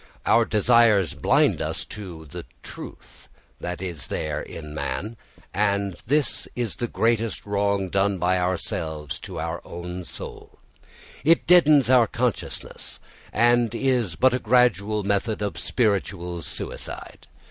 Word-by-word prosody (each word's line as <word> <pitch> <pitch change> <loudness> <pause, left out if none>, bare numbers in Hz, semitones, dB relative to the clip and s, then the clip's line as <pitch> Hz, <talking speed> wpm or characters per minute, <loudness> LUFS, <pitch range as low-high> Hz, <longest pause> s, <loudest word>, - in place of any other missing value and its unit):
Our 115 - +4
desires 105 - +4
blind - - +2
us - - -3
to 90 -6 -9
the 75 - -8 0.2
truth - - -11 0.3
that 90 0 -4 0.3
there 75 -1 -2
is - - -9
in 75 0 -8
man, 75 - -3 0.4
and 100 -2 +1
this 145 -2 +1
is 120 -4 -2
the 120 - -2
greatest 115 -1 0
wrong 100 -1 0
done 100 +1 +1
by 90 +1 +1
ourselves 80 -4 -3
to - - -7
our - - -3
own 90 +1 -6
soul. - - -9 0.7
It 165 +3 +4
deadens 155 -7 +6
our 125 -3 +6
consciousness, 120 -1 -3 0.3
and 120 -1 +3
is 120 -9 +1
but 130 +6 +4
a 125 - +1
gradual 110 -4 +2
method 100 +2 0
of 100 - -3
spiritual 95 -6 -1
suicide. - - -6
100 Hz, 130 wpm, -24 LUFS, 90-120 Hz, 0.7 s, deadens